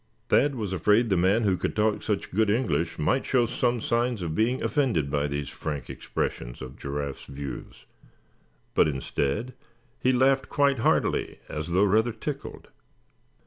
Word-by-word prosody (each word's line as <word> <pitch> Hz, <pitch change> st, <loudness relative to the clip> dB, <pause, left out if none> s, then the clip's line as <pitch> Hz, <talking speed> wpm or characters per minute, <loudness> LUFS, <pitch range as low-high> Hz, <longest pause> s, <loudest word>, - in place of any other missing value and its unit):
Thad 140 Hz, 0 st, +4 dB
was 105 Hz, -6 st, -3 dB
afraid 105 Hz, +6 st, +3 dB
the -, -, +4 dB
man 95 Hz, +6 st, +3 dB
who 100 Hz, -3 st, +3 dB
could -, -, -3 dB
talk 110 Hz, 0 st, +1 dB
such 105 Hz, -3 st, -2 dB
good 110 Hz, +2 st, +2 dB
English 85 Hz, -, 0 dB
might 130 Hz, -, +1 dB
show 125 Hz, -3 st, +2 dB
some 120 Hz, +1 st, 0 dB
signs 120 Hz, -2 st, 0 dB
of 80 Hz, -2 st, -2 dB
being 115 Hz, +8 st, +1 dB
offended 110 Hz, -, +1 dB
by 75 Hz, 0 st, +1 dB
these 70 Hz, -1 st, -3 dB
frank 75 Hz, -4 st, -5 dB
expressions -, -, -4 dB
of 65 Hz, 0 st, -8 dB
Giraffe's 70 Hz, -1 st, -5 dB
views; 70 Hz, 0 st, -8 dB, 0.9 s
but -, -, +4 dB
instead 75 Hz, -, -2 dB, 0.5 s
he 130 Hz, -, +3 dB
laughed 130 Hz, +1 st, +3 dB
quite 140 Hz, -3 st, +2 dB
heartily, -, -, +1 dB
as 75 Hz, +1 st, -4 dB
though 90 Hz, +3 st, +3 dB
rather 110 Hz, +4 st, +3 dB
tickled. 140 Hz, +5 st, -6 dB
105 Hz, 155 wpm, -27 LUFS, 75-120 Hz, 0.9 s, Thad